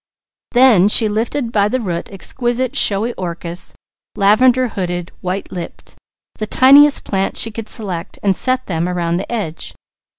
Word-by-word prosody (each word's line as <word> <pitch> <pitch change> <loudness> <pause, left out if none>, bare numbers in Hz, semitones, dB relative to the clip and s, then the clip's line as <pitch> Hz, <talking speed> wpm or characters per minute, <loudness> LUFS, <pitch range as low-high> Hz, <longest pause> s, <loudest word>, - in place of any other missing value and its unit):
Then 240 -7 +5
she 220 +1 +5
lifted 230 +4 -2
by 205 -3 +2
the 255 +5 -1
root 175 -7 -4
exquisite 245 +6 -2
showy 220 -1 +1
orchis, 170 -1 -4 0.4
lavender 245 +5 +3
hooded, 175 -4 -4
white 185 +2 -4
lipped, 175 -2 -9 0.4
the 215 - -3
tiniest 280 +5 +5
plants 195 -1 -2
she 225 - +1
could 220 0 -8
select 190 -5 -5
and 195 -2 +2
set 255 +5 0
them 170 -1 -2
around 170 -1 -1
the 190 - -6
edge. 200 -9 -5
205 Hz, 145 wpm, -17 LUFS, 180-240 Hz, 0.4 s, Then